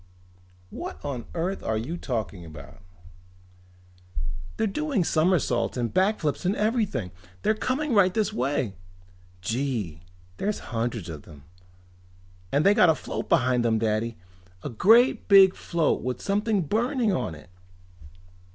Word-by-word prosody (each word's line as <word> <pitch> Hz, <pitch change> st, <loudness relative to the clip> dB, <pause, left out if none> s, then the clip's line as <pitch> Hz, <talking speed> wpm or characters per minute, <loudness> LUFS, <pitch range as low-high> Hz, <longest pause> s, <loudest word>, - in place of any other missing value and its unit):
"What 75 Hz, -, -6 dB
on 130 Hz, -5 st, -4 dB
earth 180 Hz, +4 st, -2 dB
are 110 Hz, -, -1 dB
you 125 Hz, +10 st, -4 dB
talking 110 Hz, -, -4 dB
about?" 75 Hz, -1 st, -12 dB, 1.8 s
"They're 220 Hz, -, +1 dB
doing 275 Hz, -, 0 dB
somersaults 155 Hz, -9 st, +1 dB
and 120 Hz, -2 st, -2 dB
back 195 Hz, +4 st, +2 dB
flips 150 Hz, -3 st, -1 dB
and 185 Hz, +3 st, +1 dB
everything! 210 Hz, -, 0 dB, 0.3 s
They're 215 Hz, -, +3 dB
coming 260 Hz, +6 st, -1 dB
right 195 Hz, -3 st, +5 dB
this 215 Hz, +1 st, 0 dB
way! 130 Hz, -, -1 dB, 0.7 s
Gee, 110 Hz, -, -2 dB, 0.4 s
there's 210 Hz, +1 st, -1 dB, 0.2 s
hundreds 115 Hz, -4 st, -2 dB
of 80 Hz, -4 st, -7 dB
them. 75 Hz, -3 st, -15 dB, 1.1 s
And 145 Hz, +4 st, +2 dB
they 200 Hz, -, +7 dB
got 180 Hz, -, +5 dB
a 160 Hz, -, +4 dB
float -, -, -5 dB
behind 130 Hz, -6 st, +3 dB
them, 115 Hz, -1 st, +2 dB
Daddy! 110 Hz, +1 st, -1 dB, 0.5 s
A -, -, -3 dB
great 230 Hz, -, +4 dB
big 195 Hz, -2 st, +7 dB
float 170 Hz, -3 st, 0 dB
with 125 Hz, 0 st, -3 dB
something 205 Hz, -1 st, 0 dB
burning 230 Hz, -, +1 dB
on 80 Hz, -, -2 dB
it." 90 Hz, -, -15 dB
155 Hz, 135 wpm, -26 LUFS, -, 1.8 s, they